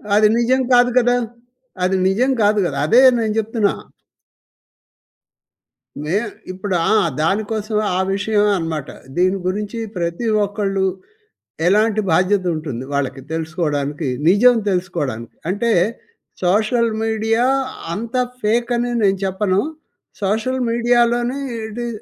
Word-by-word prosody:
అది 215 0 +6
నిజం 255 +2 +2
కాదు 245 0 +5
కదా! 245 0 +4 0.7
అది 190 +1 +2
నిజం 245 +8 +2
కాదు 210 0 +3
కదా! - - -3
అదే 245 +4 +6 0.2
నేను 215 -2 0
చెప్తున్నా. 220 -1 0 2.3
మే 160 +6 -1 0.4
ఇప్పుడు 190 0 -3 0.2
ఆ! - - +4 0.3
దానికోసమే 215 +4 -1
ఆ - - +1
విషయమే 210 +1 +1
అనమాట. 160 -4 -3 0.3
దీని 185 +2 +2
గురించి 210 +4 -3 0.2
ప్రతి 170 +6 -2 0.2
ఒక్కళ్ళు 195 -2 -1 0.8
ఎలాంటి 215 +3 +3
బాధ్యత 185 +3 +2
ఉంటుంది 135 -5 -5
వాళ్ళకి 135 -1 -2
తెలుసుకోవడానికి, 155 -3 -2 0.2
నిజం 240 +6 +6
తెలుసుకోవడానికి. 145 - -3
అంటే 205 +5 0 0.7
సోషల్ 220 +5 +2
మీడియా 225 +1 +1 0.5
అంతా 235 +4 -2 0.2
ఫేక్ 235 +3 +1
అని 240 +1 -1
నేను 195 -1 +2
చెప్పను. 190 0 +1 0.6
సోషల్ 225 +6 0
మీడియాలోని 240 +2 +2 0.3
ఇది 240 +2 -5
210 Hz, 110 wpm, -19 LUFS, 185-230 Hz, 2.3 s, అది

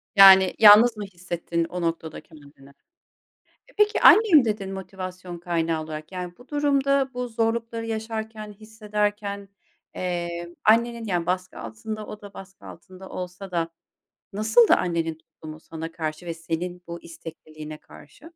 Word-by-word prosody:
Yani 190 -1 +8
yalnız 220 +2 +8
mı 210 - -4
hissettin 175 -2 -4
o 180 +1 -6
noktada 165 -1 -3
kendini? 140 -3 -17 1.0
E, - - -20
peki, 420 +1 +2
"annem" 375 - +7
dedin 205 -3 -3
motivasyon 185 -2 -7
kaynağı 165 -2 -1
olarak, 155 +2 -8
yani 180 -1 -5
bu 245 - -17
durumda 280 -2 +1
bu 250 0 -3
zorlukları 230 0 -2
yaşarken, 220 -1 -5
hissederken, 210 -1 -4 0.5
eee, 175 -1 -4
annenin 235 +1 +3
yani 175 -4 -1
baskı 185 0 -3
altında, 215 - -7
o 210 - -9
da 205 -1 -12
baskı 195 0 -12
altında 185 +2 -12
olsa 185 +2 -7
da 170 -2 -1 0.7
nasıldı 220 +3 +4
annenin 165 -2 0
tutumu 160 -1 -12
sana 165 0 -8
karşı 155 +1 -5
ve 170 - -4
senin 170 +2 -5
bu 170 0 -7
istekliliğine 155 -2 -10
karşı? 150 - -17
185 Hz, 135 wpm, -24 LUFS, 170-220 Hz, 1.0 s, Yani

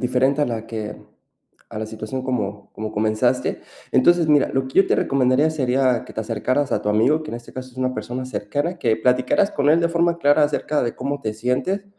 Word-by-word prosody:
diferente 130 +3 +1
a 145 - +2
la 115 -2 -4
que 110 -2 -5 0.7
a - - -6
la 110 - -3
situación 110 +4 -6
como 105 -6 -4
como 110 0 -5
comenzaste. 110 +1 0 0.3
Entonces, 170 +6 +4
mira, 150 -2 +4
lo 135 0 -1
que 130 - 0
yo - - +2
te - - +2
recomendaría 135 +3 +2
sería 130 -4 +1
que - - -12
te 110 - -2
acercaras 125 +6 -1
a - - +1
tu - - -2
amigo, 125 +10 +3
que 155 - -8
en 115 - -4
este 120 - -13
caso 130 0 -7
es - - -22
una 130 0 0
persona 130 +1 -5
cercana. 145 - -3
Que 115 -6 +1
platicaras 125 - +2
con 140 0 0
él 160 - +5
de 170 - +2
forma 170 0 +1
clara 145 0 +4
acerca 150 0 -1
de 120 - -3
cómo 140 +2 -3
te 110 -3 -3
sientes, 130 - -1
130 Hz, 220 wpm, -21 LUFS, 115-145 Hz, 0.7 s, él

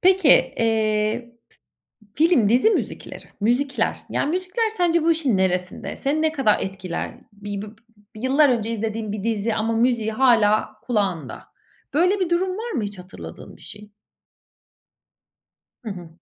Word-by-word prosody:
Peki, 375 -4 +4
eee 220 0 +2 0.9
f 310 - +3
film, 240 - +3
dizi 250 - +4
müzikleri, - - -4 0.2
müzikler. 250 +6 0
Yani 285 - 0
müzikler 370 +6 -1
sence 345 -5 +1
bu 330 - +3
işin 285 -10 +1
neresinde? 180 -1 -1
Seni 295 +3 -1
ne 315 0 +2
kadar 265 -9 +2
etkiler? 190 -2 -5
Bir 205 0 -6
b - - -7 0.5
yıllar 270 +6 +3
önce 230 -2 0
izlediğin 220 -1 -3
bir 210 -2 -5
dizi 225 -1 0
ama 225 +1 -1
müziği 230 -2 +1
hâlâ 220 -4 +3
kulağında. 195 - -2 0.5
Böyle 365 +6 +3
bir 355 - 0
durum 360 +2 +1
var 465 +1 -5
mı 240 - -1
hiç 205 -2 -5
hatırladığın 180 +1 -11
bir - - -17
şey? 210 0 -11 1.9
Hı - - -5
hı. 175 -3 -8
230 Hz, 145 wpm, -22 LUFS, 210-310 Hz, 1.9 s, Peki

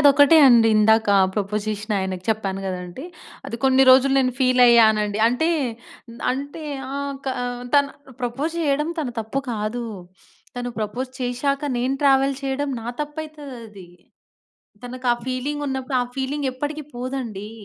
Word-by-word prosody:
అదొక్కటే 285 +2 +6
అండి 230 -3 +6
ఇందాక 220 0 +4 0.3
ప్రపోజ్ 210 0 -2
జేసిన 215 +1 -3
ఆయనకి 185 -1 -4
చెప్పాను 195 -3 -1
గదండీ. 180 - -6 0.4
అది 230 - -5
కొన్ని 265 0 +5
రోజులు 270 +1 +5
నేను 255 -1 +2
ఫీల్ 255 -1 +3
అయ్యానండి. 220 -3 +4
అంటే 320 +8 0 0.8
అంటే 285 +4 -6 0.3
ఆ! - - -3 0.3
క - - -16 0.5
తన 285 0 +6 0.4
ప్రపోజ్ 270 +7 -3
చేయడం 300 +1 0
తన 290 -5 -1
తప్పు 225 +6 -3
కాదు, 220 +3 -3 0.7
తను 245 0 -3
ప్రపోజ్ 245 +5 -3
చేశాక, 265 +3 -1 0.2
నేను 255 +2 0
ట్రావెల్ 270 0 +4
చేయడం 275 +1 -2
నా 225 - -9 0.2
తప్పైతది 300 0 -8 0.2
అది. 195 -4 -13 1.0
తనకు 255 +1 -7
ఆ - - +2
ఫీలింగ్ 280 +3 -3
ఉన్నప్పుడు 265 0 -2
ఆ - - -2
ఫీలింగ్ 275 +1 -2
ఎప్పటికి 295 +2 -4
పోదండి. 240 -5 -5
255 Hz, 140 wpm, -22 LUFS, 220-275 Hz, 1.0 s, అదొక్కటే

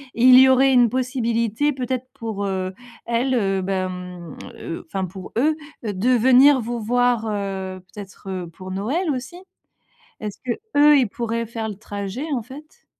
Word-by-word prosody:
il 255 +2 +7
y 260 0 +8
aurait 265 +1 +5
une 245 -2 +5
possibilité 245 +1 0
peut-être 255 -1 -3
pour, 220 -3 -5
heu, 190 -1 -2 0.3
elle, 240 +3 0
heu, 195 -4 +1
ben 185 0 -1
mmh, 180 -3 -8 0.2
heu, 165 - -6
enfin 190 +3 -3
pour 185 +1 -9
eux 305 +5 +3 0.3
de 210 +2 -1
venir 260 +3 +6
vous 235 0 -4
voir, 245 0 +1
heu, 195 -2 -4
peut-être 190 -2 -7
pour 185 +2 -9
Noël 260 - -1
aussi? 265 +6 -5 0.8
Est-ce 210 -2 -5
que 250 - 0 0.3
eux 295 0 +7
ils 250 -6 +2
pourraient 230 +1 -3
faire 225 0 -5
le 210 - -5
trajet 205 +6 -5
en 250 - -1
fait? 295 - -13
230 Hz, 160 wpm, -22 LUFS, 195-255 Hz, 0.8 s, y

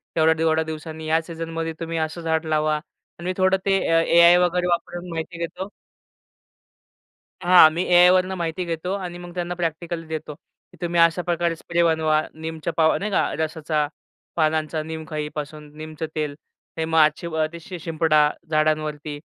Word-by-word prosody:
थोड्या-थोड्या 160 0 +3
दिवसांनी 160 0 -7
या 160 +1 +2
सीझनमध्ये 165 0 -5
तुम्ही 165 0 -4
असं 160 +2 -3
झाड 160 0 0
लावा 155 0 +1
आणि 170 +2 -15
मी 185 - -1
थोडं 190 0 +3
ते 195 -1 +3
अ, 165 0 +4
ए-आय 170 +1 +6
वगैरे 180 0 +1
वापरून 175 +1 -2
माहिती 165 +1 -5
घेतो. 180 +3 -5 1.7
हां, 175 -3 +8
मी 170 +3 -1
ए-आय 180 0 +6
वरून 185 +1 +2
माहिती 170 +1 -2
घेतो 170 +3 -3
आणि 180 -3 -5
मग 175 0 -10
त्यांना 175 0 -2
प्रॅक्टिकल्स 165 -1 -3
देतो, 155 -1 -5
की 180 - -26
तुम्ही 170 0 0
अशा 165 +1 +4
प्रकारे 170 -1 0
स्प्रे 170 +1 -1
बनवा. 160 -2 +2
नीमच्या 160 +1 -5
पाव 160 -1 +4
नाही 210 +1 -3
का? - - +1
रसाचा 155 -1 -1 0.5
पानांचा 155 -1 0
नीम 160 0 -6
खाईपासून 150 -1 -6
नीमचं 155 0 -6
तेल. 150 -2 -2 0.4
हे 160 - 0
मग 160 0 -1
आजची 155 +2 +3
व 160 -1 0 0.2
शि 180 +1 -8
शिंपडा 155 -2 +2 0.2
झाडांवरती 155 -1 -1
165 Hz, 160 wpm, -23 LUFS, 155-175 Hz, 1.7 s, हां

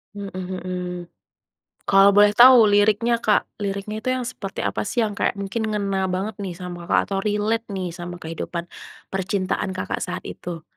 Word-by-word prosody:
Mhm 200 -1 -6
mhm. 185 0 -4 1.1
Kalau 195 0 +7
boleh 205 0 +7
tau 250 +2 +9
liriknya, 215 +3 +3
Kak, 215 -3 +1
liriknya 200 +2 -3
itu - - -3
yang 255 - -2
seperti 210 -6 -6
apa - - -1
sih 235 +3 0
yang 215 - 0
kayak - - +1
mungkin 200 +3 -3
ngena 195 -2 -1
banget 195 +3 -3
nih 185 -3 -4
sama, 175 -1 -7
Kakak, - - +3
atau 195 - 0
relate 210 +3 0
nih 185 -2 -3
sama 175 +1 -7
kehidupan 165 +1 -5 0.5
percintaan, 190 0 -1
Kakak, 185 - -3
saat 180 0 -4
itu? 170 -2 -7
195 Hz, 165 wpm, -23 LUFS, 185-210 Hz, 1.1 s, tau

